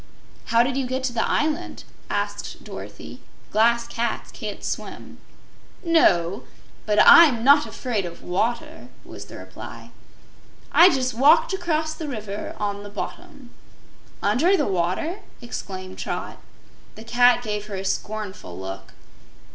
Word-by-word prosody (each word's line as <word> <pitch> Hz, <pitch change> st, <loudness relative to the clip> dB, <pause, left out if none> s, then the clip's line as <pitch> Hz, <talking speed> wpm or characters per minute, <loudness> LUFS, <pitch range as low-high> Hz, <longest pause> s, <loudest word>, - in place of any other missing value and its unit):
"How 230 Hz, 0 st, +4 dB
did 260 Hz, +1 st, -2 dB
you 265 Hz, -2 st, -1 dB
get 260 Hz, +1 st, -3 dB
to 255 Hz, -2 st, -1 dB
the 230 Hz, -, +1 dB
island?" 310 Hz, +3 st, -1 dB, 0.3 s
asked -, -, -4 dB
Dorothy. -, -, -9 dB, 0.3 s
"Glass 235 Hz, +2 st, +3 dB
cats 235 Hz, 0 st, -3 dB
can't -, -, -7 dB
swim." -, -, -6 dB, 0.7 s
"No, 195 Hz, -, +3 dB, 0.5 s
but 210 Hz, 0 st, +1 dB
I'm 280 Hz, -9 st, +8 dB
not 285 Hz, +3 st, +6 dB
afraid 235 Hz, -6 st, -3 dB
of 170 Hz, -, -11 dB
water," 235 Hz, -, -2 dB, 0.2 s
was -, -, -10 dB
the -, -, -11 dB
reply. -, -, -10 dB, 0.8 s
"I 355 Hz, -, +8 dB
just 260 Hz, -6 st, 0 dB
walked 285 Hz, -, +5 dB
across 315 Hz, -4 st, -1 dB
the 315 Hz, -1 st, -6 dB
river 215 Hz, -6 st, -6 dB
on 205 Hz, -1 st, -3 dB
the 205 Hz, -, -9 dB
bottom." 255 Hz, -, -8 dB, 0.7 s
"Under 295 Hz, -, +3 dB
the -, -, +1 dB
water?" 190 Hz, -, -1 dB, 0.2 s
exclaimed 190 Hz, -5 st, -7 dB
Trot. -, -, -5 dB, 0.6 s
The 220 Hz, -, -10 dB
cat 245 Hz, +1 st, +4 dB
gave 210 Hz, -2 st, -4 dB
her 205 Hz, -, -5 dB
a 190 Hz, 0 st, -5 dB
scornful 205 Hz, -, -4 dB
look. 95 Hz, +1 st, -8 dB
235 Hz, 135 wpm, -23 LUFS, 205-290 Hz, 0.8 s, I'm